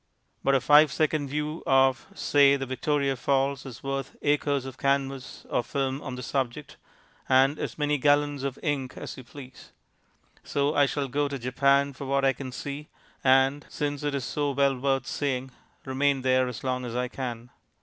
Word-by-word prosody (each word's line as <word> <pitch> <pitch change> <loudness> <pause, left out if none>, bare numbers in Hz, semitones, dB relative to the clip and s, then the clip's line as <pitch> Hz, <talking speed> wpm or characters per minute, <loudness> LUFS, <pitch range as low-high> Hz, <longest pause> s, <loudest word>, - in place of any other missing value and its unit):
But 135 - +3
a 135 - +2
five 150 0 +6
second 155 -1 0
view 150 +3 -3
of 135 -1 +3
(say) 140 -1 +4
the 135 -1 -3
Victoria 140 +1 0
Falls 135 +1 0
is 125 -3 -10
worth 135 -1 -4
acres 145 -2 +1
of 135 - -9
canvas 135 -1 -1
or - - 0
film 135 +1 -2
on 130 -3 -6
the 125 - -7
subject, 130 +4 -3 0.5
and 135 +3 +4
as - - -4
many 150 -1 +1
gallons 145 0 +2
of 135 -1 -3
ink 140 -4 -2
as - - -6
you 130 - -10
please. 130 +1 -13 0.7
So 145 +1 0
I 145 -2 +4
shall 140 0 -2
go 145 +3 0
to 140 0 -4
Japan 140 +3 +2
for 140 - -8
what 135 0 +1
I 135 - +4
can 130 0 -7
see, 145 +4 -6 0.4
and 135 +2 +4
(since 145 -1 -3
it 145 -1 -1
is 135 -3 -2
so 145 -1 -1
well 140 0 +2
worth 135 +1 0
seeing) 130 -2 -2 0.3
remain 135 0 +1
there 130 0 +3
as 125 0 -6
long 125 -1 -1
as 120 -1 -5
I 125 0 0
can. 120 -2 -6
135 Hz, 185 wpm, -27 LUFS, 130-145 Hz, 0.7 s, five